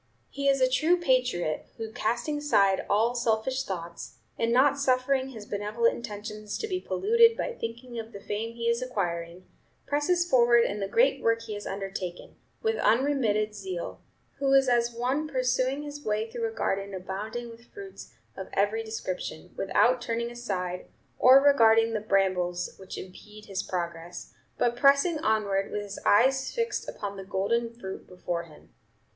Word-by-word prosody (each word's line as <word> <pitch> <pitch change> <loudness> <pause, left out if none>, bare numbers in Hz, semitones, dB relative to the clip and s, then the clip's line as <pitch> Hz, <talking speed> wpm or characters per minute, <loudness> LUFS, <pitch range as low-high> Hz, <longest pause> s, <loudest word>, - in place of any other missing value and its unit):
He 280 0 -2
is 275 0 +3
a 255 - +6
true 310 +7 +3
patriot, 250 - 0
who, 225 -1 -5
casting 240 +8 -1
aside 200 -10 +2
all 225 +4 +3
selfish 240 +2 0
thoughts, 170 -6 -6 0.2
and 230 0 0
not 275 +3 +4
suffering 260 0 +1
his 220 -5 -9
benevolent 210 +3 0
intentions 210 -1 -6
to 440 - -3
be 370 -3 -2
polluted 460 +4 +4
by - - -2
thinking 235 - -6
of 225 0 -7
the 200 - -9
fame 225 +3 -4
he 235 0 -3
is 235 +1 +1
acquiring, 175 -7 -3 0.4
presses 345 +5 +1
forward 240 -5 +5
in 205 -1 -2
the 195 - -2
great 475 - +3
work 230 0 +1
he 220 -2 -6
has 205 0 -6
undertaken, 195 -2 -5 0.3
with 445 0 +1
unremitted 225 -5 +2
zeal; 190 -4 -6 0.4
who 275 -1 +1
is 270 -1 +5
as 240 -1 +2
one 255 +6 -1
pursuing 255 0 0
his 290 0 -8
way 215 0 -1
through 230 0 -3
a - - -9
garden 195 -2 -2
abounding 210 +6 -5
with 230 +1 -16
fruits 395 -2 -10 0.2
of 190 - -7
every 205 +3 +1
description, 185 -5 -5
without 240 +5 +2
turning 235 0 -2
aside, 185 -7 -4 0.3
or 260 +2 +8
regarding 225 -5 +5
the 220 - 0
brambles 185 -4 0
which 190 -1 -8
impede 210 +3 -11
his 195 -2 -3
progress, 170 -2 -5 0.2
but 240 0 +1
pressing 280 +5 +4
onward 205 -6 +1
with 210 - -3
his 205 -1 -7
eyes 265 +5 +4
fixed 465 -2 -2
upon 200 -1 -6
the 195 - -6
golden 205 +5 0
fruit 195 -5 -8
before 175 -2 -4
him. 155 -2 -18
230 Hz, 165 wpm, -28 LUFS, 195-260 Hz, 0.4 s, or